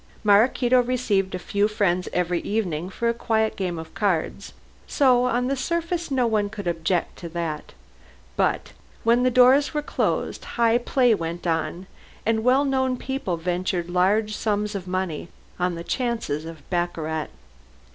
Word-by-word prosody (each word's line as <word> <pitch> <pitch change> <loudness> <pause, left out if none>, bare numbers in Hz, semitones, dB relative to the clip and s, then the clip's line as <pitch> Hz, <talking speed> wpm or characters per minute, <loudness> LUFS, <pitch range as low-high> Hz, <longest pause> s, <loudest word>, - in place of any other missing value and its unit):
Maraquito 240 +4 +4
received 230 -7 0
a - - -1
few 200 +3 0
friends 185 -4 0
every 175 -1 0
evening 180 -6 -2
for 235 +4 -2
a 235 - +2
quiet 220 -1 0
game 180 -3 -2
of 160 0 -8
cards, 200 -1 -1 0.4
so 250 -4 +4
on 250 0 +1
the 275 +2 0
surface 335 +4 -2
no 260 -3 +2
one 215 -3 +1
could 205 -2 -7
object 170 +1 -1
to 170 - -7
that. 165 -3 -4 0.6
But - - 0 0.3
when 235 +2 +4
the 255 - +4
doors 255 +4 +5
were 300 - 0
closed, - - -1
high 235 0 +2
play 245 -1 +3
went 170 -2 -4
on 170 +2 -1 0.4
and 220 0 +1
well 260 +4 +4
known 260 -2 +1
people 265 -11 -3
ventured 175 0 -2
large 210 +4 +2
sums 210 -1 -1
on 180 -1 -4
the 170 - -6
chances 235 - -2
of 160 -3 -10
baccarat. 160 -3 -1
205 Hz, 150 wpm, -24 LUFS, 175-245 Hz, 0.6 s, doors